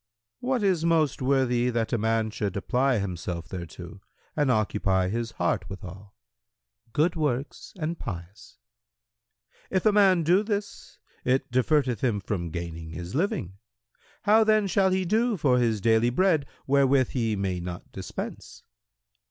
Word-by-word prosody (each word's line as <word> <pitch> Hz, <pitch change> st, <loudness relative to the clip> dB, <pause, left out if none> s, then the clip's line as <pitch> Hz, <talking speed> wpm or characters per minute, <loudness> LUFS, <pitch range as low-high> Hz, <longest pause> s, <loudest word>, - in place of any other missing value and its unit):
Q 245 Hz, -, -7 dB
"What 255 Hz, -5 st, +1 dB
is 185 Hz, -5 st, +2 dB
most 160 Hz, -5 st, +2 dB
worthy 130 Hz, -2 st, +2 dB
that 115 Hz, 0 st, -1 dB
a -, -, +3 dB
man 110 Hz, 0 st, 0 dB
should 100 Hz, -3 st, -3 dB
apply 125 Hz, +5 st, +1 dB
himself 90 Hz, -3 st, -4 dB
thereto 85 Hz, +1 st, -8 dB, 0.3 s
and 145 Hz, -3 st, +1 dB
occupy 100 Hz, -5 st, +1 dB
his 115 Hz, +2 st, -3 dB
heart 90 Hz, 0 st, -1 dB
withal?"— 95 Hz, +1 st, -10 dB, 0.8 s
"Good 160 Hz, +8 st, +1 dB
works 145 Hz, -4 st, -2 dB
and 165 Hz, +1 st, -3 dB
pious." 95 Hz, +2 st, -8 dB, 1.1 s
Q 190 Hz, -, +1 dB
"If 185 Hz, -, -1 dB
a 215 Hz, -, +6 dB
man 195 Hz, -4 st, +4 dB
do 180 Hz, +5 st, +4 dB
this 205 Hz, -1 st, -5 dB, 0.3 s
it 130 Hz, 0 st, 0 dB
diverteth 130 Hz, -2 st, +2 dB
him 115 Hz, -6 st, +1 dB
from 95 Hz, -3 st, -3 dB
gaining 85 Hz, 0 st, -6 dB
his 85 Hz, +3 st, -7 dB
living; 105 Hz, -, -2 dB, 0.6 s
how 215 Hz, +2 st, +5 dB
then 215 Hz, -1 st, +3 dB
shall 190 Hz, +1 st, +2 dB
he 185 Hz, 0 st, 0 dB
do 220 Hz, +4 st, +1 dB
for 130 Hz, -6 st, +3 dB
his 115 Hz, -3 st, +1 dB
daily 115 Hz, +3 st, +3 dB
bread 155 Hz, +1 st, +2 dB, 0.2 s
wherewith 135 Hz, -1 st, +3 dB
he 115 Hz, -4 st, -1 dB
may 95 Hz, -2 st, -2 dB
not 90 Hz, 0 st, -7 dB
dispense?" 95 Hz, -2 st, -7 dB
120 Hz, 150 wpm, -26 LUFS, 100-165 Hz, 1.1 s, a